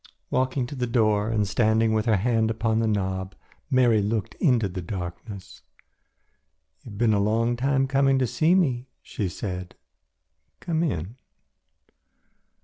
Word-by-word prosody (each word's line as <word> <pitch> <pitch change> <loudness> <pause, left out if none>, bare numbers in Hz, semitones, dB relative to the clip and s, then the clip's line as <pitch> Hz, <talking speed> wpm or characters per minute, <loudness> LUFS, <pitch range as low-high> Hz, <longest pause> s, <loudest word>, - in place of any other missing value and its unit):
Walking 130 0 0
to 120 - -8
the 125 -3 -2
door 110 -3 +2
and 105 -3 0
standing 110 +2 +2
with 110 +1 0
her 110 - +4
hand 110 +2 +1
upon 110 0 0
the 115 - +1
knob, 95 -2 -2 0.3
Mary 120 -4 +4
looked 105 -1 -2
into 125 - +3
the 90 0 -6
darkness. 90 +2 -7 1.2
"You - - -12
have 100 - -10
been 115 -1 +3
a 100 - +2
long 115 +4 +1
time 135 +2 +1
coming 135 0 +2
to 130 - +2
see 155 +9 +2
me," 130 -9 +1 0.2
she 100 -4 -3
said, 90 -1 -6 0.8
"come 165 -2 -1
in." 110 - -3
110 Hz, 145 wpm, -25 LUFS, 100-125 Hz, 1.2 s, her